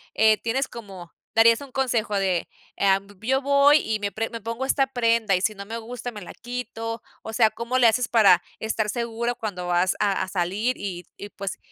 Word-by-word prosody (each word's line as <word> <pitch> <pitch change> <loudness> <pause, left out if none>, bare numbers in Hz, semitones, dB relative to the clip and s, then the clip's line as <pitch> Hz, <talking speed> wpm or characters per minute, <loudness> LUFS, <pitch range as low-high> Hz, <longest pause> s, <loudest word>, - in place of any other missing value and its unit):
eh, 220 -1 +5
¿tienes 255 +4 -1
como 195 -7 -10 0.2
darías 230 +2 +6
un 280 -2 -10
consejo 240 -5 0
de, 190 -3 0 0.3
em, 195 0 +2
yo 265 +4 +1
voy 280 +1 +5
y 220 -5 -2
me 205 0 -2
pre 225 +2 -3
me 230 -1 -7
pongo 230 +4 -3
esta 270 0 +2
prenda, 230 -5 +2
y - - -4
si 215 +2 0
no 200 0 -8
me 225 +3 -5
gusta, 245 +2 -6
me 210 -3 -9
la 180 - -9
quito, 230 -2 -5 0.2
o 220 - -7
sea, 220 -1 +4
cómo 235 +4 -2
le 245 -2 +6
haces 240 +2 +2
para 205 -6 +5 0.2
estar 220 -1 -1
seguro 235 +1 -2
cuando 185 -6 -5
vas 175 +1 +2
a 200 -2 +1
a - - -5
salir 195 +7 -1
y 180 -3 -5
y, 205 - -8
pues, 195 -1 -6
225 Hz, 210 wpm, -24 LUFS, 200-240 Hz, 0.3 s, darías